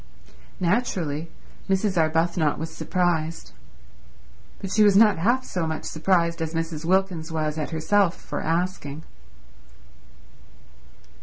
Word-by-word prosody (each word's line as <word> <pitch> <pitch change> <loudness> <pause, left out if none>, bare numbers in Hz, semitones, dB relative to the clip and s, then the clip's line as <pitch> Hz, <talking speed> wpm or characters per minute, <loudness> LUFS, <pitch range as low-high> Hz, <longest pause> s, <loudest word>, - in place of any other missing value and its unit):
Naturally 170 -6 -1 0.4
Mrs. 195 0 +1
Arbuthnot 160 -1 +1
was 160 +2 -5
surprised; 170 -3 -1 1.1
but 195 - -6
she 215 - +3
was 205 -2 +5
not 210 -5 +5
half 245 +8 +1
so 170 -3 -2
much 160 0 -4
surprised 170 0 +1
as 160 0 -3
Mrs. 165 -1 -3
Wilkins 180 -3 0
was 155 -1 -2
at 150 - -3
herself 175 +3 +2
for - - -5
asking. 165 -3 -2
170 Hz, 110 wpm, -24 LUFS, 160-190 Hz, 1.1 s, was